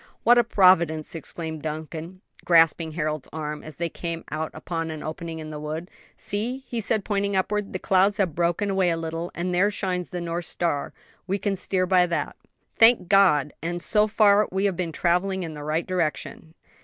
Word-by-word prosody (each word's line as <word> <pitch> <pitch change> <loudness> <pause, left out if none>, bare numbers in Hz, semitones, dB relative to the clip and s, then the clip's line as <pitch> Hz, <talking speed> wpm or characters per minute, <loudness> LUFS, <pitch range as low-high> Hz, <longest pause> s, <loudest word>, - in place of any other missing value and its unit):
"What 240 +1 +6
a - - +5
providence!" 170 -7 +3
exclaimed 160 -1 -6
Duncan, 160 +4 -6 0.2
grasping 165 -1 +4
Harold's 155 -3 -2
arm, 150 -1 -5
as 155 -2 -11
they 170 - -1
came 170 0 -5
out 155 +1 -2
upon 165 +1 -4
an 155 -1 -6
opening 160 +1 -5
in 155 -1 -7
the 150 - -6
wood. 155 +4 -5 0.3
"See!" 240 +6 -3
and 235 -2 -1
he 220 +2 +1
pointed 200 0 -1
upward, 205 +2 -1
"the - - -3
clouds 190 +2 +2
have 190 -6 +1
broken 175 +5 0
away 190 -2 +2
a 165 - 0
little, 165 +1 -4
and 180 +1 -2
there 190 +4 +3
shines 185 -3 -3
the 180 - -4
North 170 0 -3
Star: 165 -5 -2 0.4
we 195 +2 0
can 200 0 -1
steer 185 0 -1
by 180 -1 +4
that." 170 -4 -2 0.4
"Thank 225 -6 +6
God! 165 -8 +4
and, 175 +1 -3
so 210 +4 +3
far, 210 -1 +4
we 190 +2 0
have 195 -3 +1
been 170 -1 -3
traveling 180 +3 0
in 160 -2 -6
the 150 -1 -8
right 155 +3 -1
direction." 165 -2 -3
175 Hz, 195 wpm, -25 LUFS, 160-195 Hz, 0.4 s, What